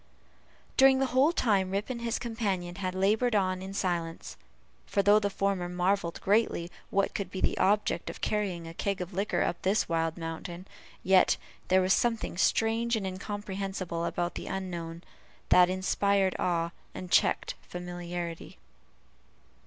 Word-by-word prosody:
During 265 0 +7
the 270 - +2
whole 270 +5 +5
time 200 - +2
Rip 200 +2 -2
and 235 -2 -5
his 235 0 -1
companion 200 -7 -2
had 185 -2 -3
labored 215 +5 +2
on 185 -2 +1
in 190 +1 -6
silence; 175 -4 -3 0.5
for 200 - +1
though 205 +2 +6
the 200 -1 0
former 195 -3 -1
marvelled 180 0 0
greatly 195 -4 +1 0.2
what 200 0 +1
could 200 -3 -3
be 190 - -5
the - - +1
object 205 +2 +1
of - - -8
carrying 190 -6 -2
a 165 - -8
keg 200 +3 -2
of 180 +1 -5
liquor 185 -2 0
up 175 - -2
this 195 +3 +1
wild 165 0 0
mountain, 170 +2 -6 0.4
yet 190 0 +5 0.3
there 185 0 +4
was 185 +1 +4
something 230 -5 0
strange 225 +5 +2
and 210 -3 -2
incomprehensible 190 -2 -4
about 175 0 -2
the - - -6
unknown, 170 -3 -5 0.5
that 180 0 +7
inspired 190 +1 +1
awe, 170 -1 0 0.2
and 180 -1 -7
checked - - +3 0.2
familiarity. 175 -1 -6
190 Hz, 155 wpm, -29 LUFS, 175-205 Hz, 0.5 s, During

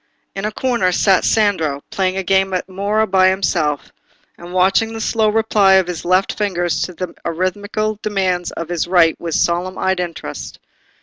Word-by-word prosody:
In 195 +1 -4
a 215 - -1
corner 235 -5 0
sat 190 +1 +3
Sandro, 165 -10 +1
playing 190 -1 -1
a 190 - -1
game 190 +1 +1
at 180 - -3
mora 200 +3 0
by 190 -2 +3
himself, 170 -6 0 0.4
and 175 +1 -11
watching 190 +5 +2
the 225 - -6
slow 220 0 +1
reply 210 -3 +3
of 190 -1 +5
his 175 -2 -5
left 185 +2 +1
fingers 175 -6 -1
to 180 - -3
the 185 +2 -5
arithmetical 205 +5 -2
demands 185 -4 -1
of 165 0 -6
his 175 -1 -2
right 170 -3 +4
with 165 -2 -3
solemn 175 +2 0
eyed 190 -1 0
interest. 165 - -6
185 Hz, 175 wpm, -18 LUFS, 175-205 Hz, 0.4 s, of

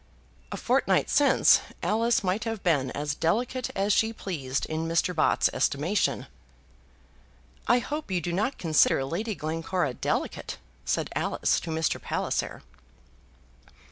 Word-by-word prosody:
A - - -4
fortnight - - +1
since 280 -2 +5 0.2
Alice 230 +1 +2
might 190 +3 0
have 225 -3 -4
been 145 -7 +2
as 145 +2 -3
delicate 240 - -1
as 195 +1 +2
she 220 +3 +2
pleased 145 -11 -3
in 160 +1 -3
Mr. 170 +2 +1
Bott's 155 - +3
estimation. 165 +9 0 1.4
"I 245 - +5
hope 295 +4 -4
you 185 -2 0
do 170 +1 -3
not 215 +9 -1
consider 155 -4 +3
Lady 205 +9 -3
Glencora 165 -1 -2
delicate," - - -3 0.3
said - - -1
Alice - - +1
to - - -8
Mr. 160 0 -1
Palliser. - - -2
180 Hz, 130 wpm, -27 LUFS, 155-220 Hz, 1.4 s, since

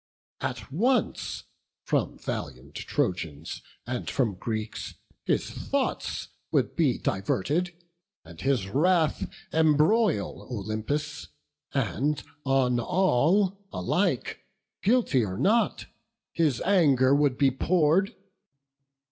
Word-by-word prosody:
At - - -4
once 235 - 0 0.4
from - - 0
valiant - - -6
Trojans 80 -4 -3 0.2
and 125 +1 -3
from 120 -7 +1
Greeks 110 +3 -4 0.3
His - - 0
thoughts - - -2 0.2
would - - +1
be - - +2
diverted, 150 - -1 0.5
and 80 0 -12
his 130 -8 +1
wrath 160 - +2 0.2
Embroil 160 - +3
Olympus, 120 +7 -3 0.4
and 135 - 0 0.2
on 130 -2 +2
all 190 - +2
alike, 90 - 0 0.4
Guilty 210 - +3
or 95 -3 -3
not, 225 - +2 0.5
his 150 -8 +1
anger 140 -9 +4
would 140 -3 +3
be 135 -2 +4
pour'd. 170 +6 +2
140 Hz, 95 wpm, -27 LUFS, 115-175 Hz, 0.5 s, anger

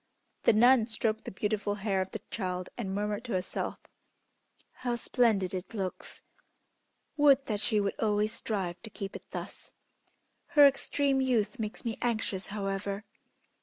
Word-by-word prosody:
The - - +7
nun 240 +1 +6
stroked 220 -1 -1
the - - -4
beautiful 205 +1 -1
hair 195 -2 0
of 185 - -3
the 220 - -7
child 185 -3 -3
and 210 -5 -4
murmured 210 +2 -1
to 240 - -3
herself, 185 0 -2 1.0
"How 245 -1 0
splendid 225 -6 +2
it 185 +5 -5
looks! 190 -3 -5 0.9
Would 280 -2 +5
that 210 -2 -1
she 215 0 +2
would 200 -1 0
always 210 0 +1
strive 195 -6 -3
to 220 - -6
keep 195 -2 -6
it - - -10
thus. - - -7 0.8
Her 290 - +11
extreme 275 0 +2
youth 240 -2 +1
makes 215 +1 -4
me 230 -1 -3
anxious, 220 -5 -1
however. 200 0 -3
215 Hz, 150 wpm, -30 LUFS, 195-235 Hz, 1.0 s, Her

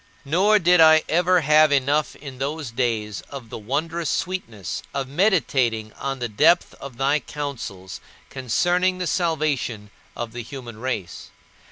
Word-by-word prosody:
Nor 190 +9 +4
did 180 -2 +4
I 160 0 +7
ever 180 +2 +3
have 155 0 +5
enough 145 +2 +1
in 135 -3 -10
those 145 -1 -3
days 115 -4 -2
of 130 -5 -9
the - - -6
wondrous 160 +8 -2
sweetness 115 - -3
of 135 -1 -2
meditating 135 - +1
on 135 0 -4
the 120 -2 -3
depth 160 +11 +3
of 135 -3 -9
thy 140 +3 +2
counsels 115 -12 -7 0.3
concerning 175 +9 +1
the 180 - -3
salvation 150 - -1 0.3
of 120 -1 -5
the 120 - -5
human 120 -2 -9
race. 125 -8 -5
140 Hz, 145 wpm, -23 LUFS, 120-165 Hz, 0.3 s, I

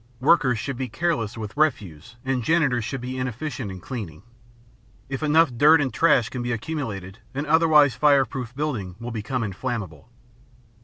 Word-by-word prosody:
Workers 130 -3 +3
should 135 +3 -4
be 130 -1 -3
careless 115 -4 -1
with 105 -2 -6
refuse 110 - -1
and 130 -1 0
janitors 135 -6 +2
should 135 +3 -4
be 130 +1 -5
inefficient 130 -1 -4
in 95 -1 -7
cleaning. 95 - -7 0.9
If 135 -1 -4
enough 155 -3 +3
dirt 150 +6 +6
and 135 -3 -1
trash 140 -8 +3
can 125 - -5
be 120 0 -2
accumulated 115 - -5 0.2
an 145 +2 -2
otherwise 155 -3 +5
fireproof 135 -4 +1
building 125 -12 -3
will 120 +1 -6
become 115 +3 -3
inflammable. 100 - -5
125 Hz, 155 wpm, -24 LUFS, 110-145 Hz, 0.9 s, dirt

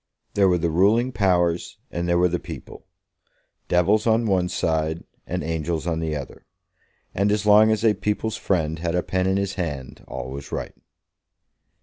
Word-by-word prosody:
There 100 -2 +4
were 90 - +3
the 85 -1 0
ruling 105 +9 +3
powers 90 -6 +1
and 85 0 -2
there 85 - +3
were 90 +1 +4
the 90 0 -1
people, - - -10 0.8
devils 100 +6 +2
on 115 +1 +3
one 95 -4 +1
side 80 -1 -1 0.2
and - - -3
angels 80 0 -2
on 80 -2 -1
the 80 -2 -2
other, 70 -3 -8 0.7
and 100 +2 +1
as 105 0 0
long 105 +1 +7
as 110 +1 +1
a 110 - +5
people's 105 +2 -2
friend 80 -4 -1
had 85 +1 -1
a 90 - +1
pen 95 0 0
in 95 +1 +2
his 100 -1 -1
hand 70 -6 -5
all 65 - -6
was 70 +1 -8
right. - - -4
90 Hz, 180 wpm, -23 LUFS, 80-105 Hz, 0.8 s, long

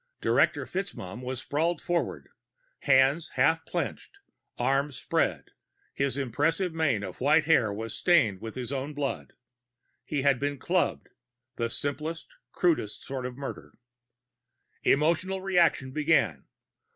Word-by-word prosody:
Director - - +2
FitzMaugham 125 - -5
was 130 0 -4
sprawled 165 +4 0
forward, 175 -1 -2 0.5
hands 135 +4 +3
half 160 +5 +3
clenched, 400 - -4 0.4
arms 140 +1 +1
spread. 130 - -1 0.4
His 140 -1 -1
impressive 145 - 0
mane 145 -10 +1
of 95 +2 -7
white 145 +4 +4
hair 130 -10 +4
was 110 +2 -5
stained 115 - +3
with 115 0 -7
his 125 -1 -4
own 140 +2 -3
blood. 145 -2 -3 0.7
He 145 -3 -2
had 140 -3 +3
been 145 0 -1
clubbed 175 +6 0 0.5
the 115 -1 -1
simplest, 150 +6 -4 0.2
crudest 160 - 0
sort 130 -2 -4
of 125 0 -9
murder. 140 -1 -7 1.1
Emotional 170 +6 +2
reaction 175 -8 +2
began. 150 +2 +1
140 Hz, 125 wpm, -28 LUFS, 130-165 Hz, 1.1 s, white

